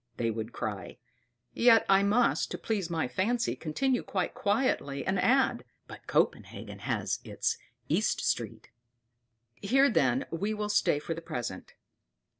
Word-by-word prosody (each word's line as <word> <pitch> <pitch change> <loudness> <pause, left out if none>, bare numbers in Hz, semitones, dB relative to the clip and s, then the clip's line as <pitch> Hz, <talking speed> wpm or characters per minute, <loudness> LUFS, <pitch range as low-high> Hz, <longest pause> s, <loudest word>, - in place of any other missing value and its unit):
they 115 -1 0
would 110 +1 -5
cry; 105 -5 -5 0.6
yet 235 -2 +5
I 195 0 +5
must, 215 +5 +2
to - - -4
please 200 -6 -2
my 165 -5 -1
fancy, 230 - 0
continue 250 - -1
quite 185 -3 -2
quietly, 200 - 0
and 190 0 0
add: 255 - +2 0.2
"But - - -12
Copenhagen - - -1
has - - -2
its - - -2 0.3
East - - +1
Street." - - -2 0.9
Here, 265 +6 +3
then, 130 - +2
we 200 +6 -2
will 210 0 -3
stay 205 -7 +2
for 150 +3 -4
the 165 - -7
present. 120 - -6
195 Hz, 140 wpm, -29 LUFS, 140-225 Hz, 0.9 s, yet